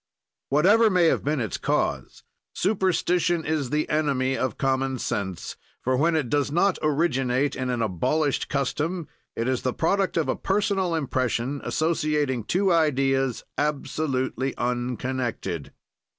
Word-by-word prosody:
Whatever 205 +11 +5
may 180 -3 +3
have 160 - +2
been 150 +1 0
its 110 -4 -2
cause, - - -1 0.3
superstition 180 -3 +1
is 150 -4 -1
the 150 +2 0
enemy 140 -4 +1
of 130 -4 -2
common 135 0 0
sense, 95 -6 -4 0.3
for, 130 +1 +1
when 160 +5 +2
it 150 -5 0
does 145 +2 0
not 180 +4 +2
originate 140 -3 +1
in 130 0 -3
an 120 -2 0
abolished 140 - 0
custom, 150 +4 -1 0.3
it 115 - -1
is 130 -1 0
the 130 - -1
product 195 +3 +1
of 165 - +1
a - - +1
personal 195 -3 0
impression, 130 -2 -1
associating 150 -6 0
two 185 - +2
ideas 135 -5 +1 0.2
absolutely 135 -3 -1
unconnected. 120 - -2
145 Hz, 135 wpm, -25 LUFS, 130-165 Hz, 0.3 s, Whatever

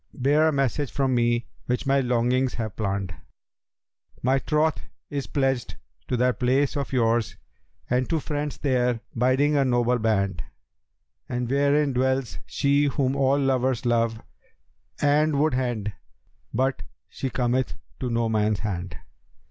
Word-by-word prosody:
* - - -45
Bear 155 +2 +5
a - - +3
message 140 -2 0
from 135 +1 0
me 120 -1 +2 0.2
which 125 +4 -1
my 135 0 +3
longings 125 +1 +1
have 110 -2 -4
planned: 100 -3 -2 1.1
My 130 +2 +3
troth 155 +2 +1 0.3
is 140 -2 -3
pledged 135 -4 -1 0.3
to 125 - 0
that 125 +1 +1
place 130 +3 +2
of 140 -1 -3
yours, 115 -3 +1 0.3
* - - -41
And 125 +1 0
to 165 - +1
friends 150 -1 -3
there 125 -4 +1
'biding—a 135 +4 +3
noble 120 -1 +2
band; 100 -3 0 0.9
And 125 0 -2
wherein 140 0 +2
dwells 130 0 0
she 140 +1 +2
whom 135 -1 0
all 135 0 +3
lovers 130 -3 +1
love 115 -1 +1 0.5
* - - -23 0.2
And 155 -1 +2
would 155 -1 +2
hend, 120 -5 -1 0.6
but 130 +2 0 0.3
she 135 - -4
cometh 125 +1 0 0.2
to 125 - -2
no 115 -1 +1
man's 110 -1 +1
hand.' 90 -6 -4
130 Hz, 145 wpm, -25 LUFS, 120-140 Hz, 1.1 s, Bear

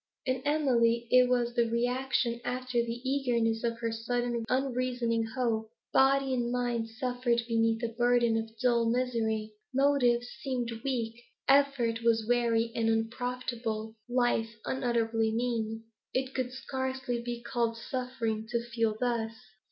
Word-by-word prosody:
In 255 0 0
Emily 235 -6 +2
it 250 0 +6
was 240 -1 +1
reaction 240 +1 +1
after 250 0 -1
the 235 +2 -4
eagerness 235 -5 +1
of 230 -1 0
her 230 -1 0
sudden 240 +1 -1
unreasoning 250 -3 0
hope. 225 -4 0 0.2
Body 270 0 +4
and 240 -1 0
mind 240 -2 -1
suffered 245 0 0
beneath 225 0 +1
a - - +2
burden 240 0 +3
of 225 0 -1
dull 235 -2 +3
misery. 225 -3 0 0.2
Motives 255 -4 +3
seemed 250 -3 -2
weak; 235 -3 -2 0.2
effort 275 -5 +3
was 225 -1 +3
weary 235 -1 +2
and 225 -1 +1
unprofitable; 225 -1 -2 0.2
life 240 -2 +1
unutterably 230 -3 +1
mean. 225 -1 -1 0.3
It 260 +1 0
could 255 -1 -2
scarcely 260 -2 -3
be 240 0 -4
called 235 -2 -1
suffering, 230 -3 -3
to 235 -1 -1
feel 225 -2 +1
thus. 235 -2 0
240 Hz, 130 wpm, -30 LUFS, 230-255 Hz, 0.3 s, it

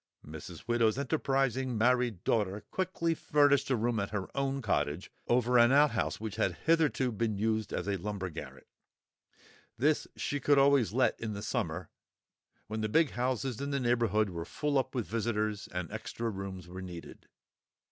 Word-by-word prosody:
Mrs. 80 +5 -9
Widow's 120 -1 +2
enterprising 135 -3 0
married 120 -4 +2
daughter 105 -2 0
quickly 185 -3 0
furnished 145 -3 +3
a 130 - +3
room 115 0 0
at 100 - -2
her 100 -3 -5
own 135 0 0
cottage 75 -4 -1 0.2
over 125 0 +3
an 120 +1 +6
outhouse 140 -5 +3
which 110 -1 -5
had 90 - +1
hitherto 150 -6 +3
been 110 -1 -1
used 110 0 0
as - - -3
a 100 -1 0
lumber 95 -1 -4
garret; - - -9 1.1
this 150 +5 +2
she 145 - -2
could 145 +1 +3
always 135 -5 +4
let 130 +4 +2
in 110 -2 -3
the 100 0 -6
summer, 85 -3 -3 0.7
when 110 +1 -4
the 110 - -1
big 160 +5 +3
houses 125 0 -2
in 140 - -2
the 140 -1 0
neighbourhood 115 -5 +2
were 85 -1 -4
full 145 - 0
up 130 0 -3
with 120 -4 -1
visitors 110 -2 -1
and 90 -3 -4
extra 115 -1 -4
rooms 95 -2 -6
were 90 +1 -8
needed. 90 -2 -9
115 Hz, 165 wpm, -31 LUFS, 100-135 Hz, 1.1 s, an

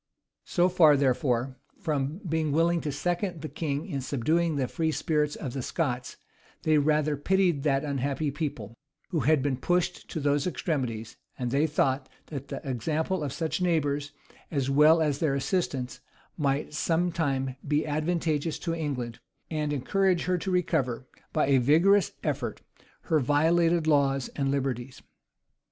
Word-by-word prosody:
So 175 0 +2
far, 160 -5 +5
therefore, 130 -1 +1 0.2
from 150 +3 -2
being 160 -2 0
willing 165 +3 +2
to 150 - -2
second 175 +3 -2
the - - -2
king 150 -2 -3
in 140 -8 -3
subduing 155 +6 0
the 135 -3 0
free 160 +4 -1
spirit 150 0 0
of 130 -6 -5
the 135 - -3
Scots, 125 -3 -2 0.5
they 155 -1 +4
rather 150 0 +2
pitied 175 0 +2
that 135 -1 +1
unhappy 140 +1 -1
people, 135 -8 -4 0.4
who 170 - 0
had 145 +1 +3
been 140 -3 0
pushed 175 +5 -1
to - - -3
those 145 +1 +1
extremities; 125 -11 -3 0.2
and 125 -1 -2
they 145 +4 +3
thought, 135 -3 0 0.2
that 140 -3 -6
the - - -6
example 155 - -1
of 140 - -2
such 160 +5 -2
neighbors, 145 -5 0 0.4
as 135 -3 -1
well 155 +3 +6
as 145 -3 0
their 150 -4 +1
assistance, 140 -4 -2 0.4
might 140 -1 -1
some 165 +3 +1
time 135 -5 -1
be 150 +1 +1
advantageous 155 0 -1
to 170 - -3
England, 135 -8 -3 0.3
and 150 -2 -1
encourage 180 +6 +1
her 180 -1 0
to 190 - -4
recover, 140 -9 0 0.3
by 155 - +2
a 135 -1 +4
vigorous 170 +10 +4
effort, 135 -7 -3 0.4
her 160 - +1
violated 165 +4 +3
laws 140 -3 +2
and 135 -2 -2
liberties. 130 -2 -2
150 Hz, 155 wpm, -28 LUFS, 135-165 Hz, 0.5 s, well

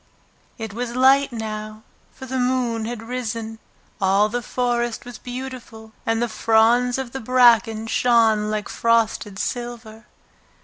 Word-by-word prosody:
It 220 -3 -6
was 240 +1 -4
light 270 +2 +4
now, 215 -1 -6 0.3
for 265 - -11
the 260 0 -3
moon 245 -3 0
had 230 -1 -5
risen. 230 -2 -5 0.4
All 195 +2 +3
the 245 +2 -2
forest 240 -1 -2
was 245 -2 -9
beautiful, 245 -3 -8 0.2
and 225 0 +1
the - - 0
fronds 230 +3 +3
of 265 -3 -5
the 265 - -5
bracken 230 -3 +4
shone 225 -2 +3
like 215 -1 -2
frosted 225 -3 0
silver. 235 -2 -5
230 Hz, 135 wpm, -22 LUFS, 220-245 Hz, 0.4 s, light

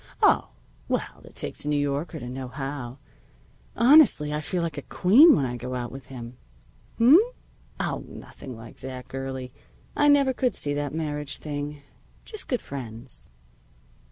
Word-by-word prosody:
Oh, - - +5 0.4
well, - - -2
it - - -15
takes - - -4
a - - -6
New 150 - +2
Yorker 145 +3 -1
to 120 - -7
know 130 +1 -5
how. 135 -1 -5 0.8
Honestly, 235 - +6
I 150 - -1
feel 175 +3 -2
like 160 -3 -3
a - - -7
queen 240 - +6
when 140 - +1
I 125 -1 -3
go 125 +2 -5
out 120 -1 -4
with 135 -1 -10
him. 120 -2 -9 0.6
H'm? 260 +9 +8 0.6
Oh, - - -2
nothing 130 -4 -10
like 115 0 -12
that, 130 -1 -7
girlie. 130 -1 -5 0.4
I 290 - +4
never 280 -2 +5
could 250 0 0
see 145 - -1
that 145 -1 -2
marriage 150 -2 -3
thing. 145 -1 -5 0.4
Just 430 -3 -5
good 250 - -1
friends." 120 -2 -7
145 Hz, 160 wpm, -26 LUFS, 130-165 Hz, 0.8 s, H'm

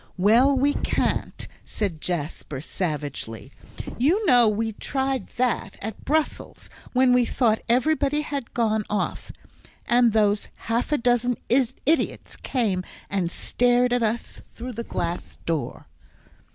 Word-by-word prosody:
"Well, 235 +9 +5
we 285 +2 +3
can't," - - -1 0.2
said 185 -8 -3
Jasper, 155 -4 -4
savagely; 145 - -4 0.5
"you 350 - +3
know 245 - +6
we 220 +1 -1
tried 265 0 -2
that 240 -5 0
at 220 0 -6
Brussels, 310 +1 -2 0.2
when 255 0 +4
we 250 0 +5
thought 230 -2 +1
everybody 290 +4 +2
had 280 -5 -5
gone 220 -2 +1
off. 210 - -2 0.5
And 240 -1 +4
those 210 -1 +2 0.2
half 235 +5 0
a 300 - +3
dozen 245 0 +2 0.5
idiots 320 +4 0
came 210 -8 -1 0.3
and 190 -4 0
stared 245 +5 +2
at 245 - +2
us 225 +1 -2
through 250 +2 -6
the 235 +1 -4
glass 170 -5 -4
door." 165 -3 -3
235 Hz, 125 wpm, -24 LUFS, 200-255 Hz, 0.5 s, know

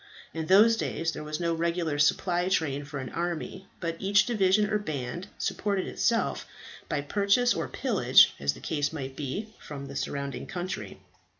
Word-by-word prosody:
In 160 0 -4
those 215 +4 +6
days 165 -6 -1
there 155 - -7
was 150 0 -4
no 170 -1 0
regular 165 -2 -1
supply 175 +4 +2
train 145 -6 0
for 145 0 -7
an 130 -2 -5
army, 175 +2 -4
but 165 -1 -3
each 195 0 +4
division 210 -2 +3
or 210 0 0
band 155 0 -4
supported 200 -2 -1
itself 230 -1 0 0.4
by 145 - 0
purchase 200 +10 +2
or - - -2
pillage, - - +4
as 70 0 +1
the - - -13
case 145 -2 -1
might 135 -4 -6
be, 195 +11 -4
from 140 -2 -8
the 140 0 -9
surrounding 140 0 -4
country. 180 +1 -5
170 Hz, 170 wpm, -28 LUFS, 145-195 Hz, 0.4 s, those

